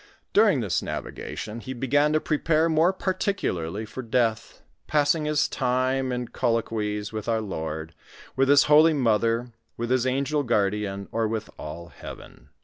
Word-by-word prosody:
During 205 - +4
this 100 -7 0
navigation 110 +2 -6
he 130 +2 -7
Jgan 145 +4 +2
to 155 - +3
prepare 155 +1 +1
more 165 +2 +3
particularly 110 - -2
for 120 +4 -7
death, 115 -2 -1 0.2
passing 150 +1 +2
his 150 -1 +2
time 130 0 0
in 125 -1 -3
colloquies 110 -3 -1
with 110 +1 -4
our 115 -1 +2
Lord, 80 -6 -5 0.4
with 135 +1 +2
His 145 0 +7
holy 155 +2 +6
mother, 115 -1 +1 0.3
with 120 +1 -3
his 130 0 +2
an 135 +2 0
gel 150 +1 0
guardian, 100 -4 -1
or 115 -1 0
with 110 0 -4
all 85 +3 -7
heaven. - - -12
125 Hz, 150 wpm, -25 LUFS, 110-145 Hz, 0.4 s, His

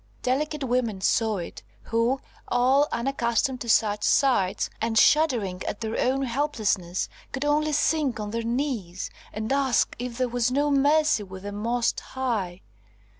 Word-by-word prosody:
Delicate 295 +3 -1
women 240 -5 0
saw 220 +2 +1
it, 170 -9 -7 0.2
who, 230 +4 +1 0.3
all 260 +4 +3
unaccustomed 250 0 0
to 235 - -5
such 210 -1 +2
sights, 245 -9 +2
and 225 0 0
shuddering 230 -12 +3
at 205 - -3
their 225 0 -3
own 265 +2 +1
helplessness, 220 -9 -1 0.2
could 270 +2 -3
only 300 +1 +2
sink 295 -4 +1
on 210 -1 -4
their 230 +1 -2
knees, 230 -7 -3 0.2
and 220 +4 -2
ask 270 -3 +2
if 245 -1 -5
there 255 -1 +1
was 245 0 0
no 290 +2 +1
mercy 295 -1 +3
with 190 -1 -9
the 205 - -5
Most 230 +3 -1
High. 215 -9 -3
240 Hz, 150 wpm, -25 LUFS, 215-275 Hz, 0.3 s, all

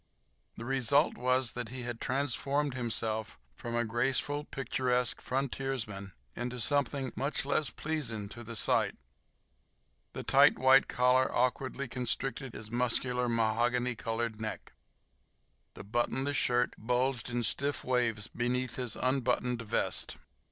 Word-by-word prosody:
The 115 - -7
result 135 +3 +3
was 125 0 +1
that 120 -3 -4
he 125 0 -6
had 120 -1 -5
transformed 140 +1 0
himself 115 -3 -2 0.2
from 115 - -5
a 120 0 +1
graceful, 135 +6 +1
picturesque 125 -3 -1
frontiersman 130 -7 -3 0.2
into 125 +1 -4
something 140 +1 +1
much 140 0 0
less 145 -1 +1
pleasing 120 -9 -3
to 120 +2 -9
the 115 +1 -7
sight. - - +2 1.2
The - - -5
tight - - +6
white 130 +1 +6
collar 125 +1 +3
awkwardly 130 +2 0
constricted 125 +1 -2
his 110 0 -6
muscular, 125 0 0
mahogany 120 +2 +1
colored 115 0 -3
neck. 110 - -5 1.0
The - - -8
buttonless 120 +6 0
shirt 125 -2 +2
bulged 125 +2 0
in 120 0 -1
stiff 140 +5 -1
waves 120 -4 +1
beneath 125 +1 -2
his 125 -3 -1
unbuttoned 125 -2 0
vest. 110 - -1
125 Hz, 125 wpm, -31 LUFS, 115-135 Hz, 1.2 s, tight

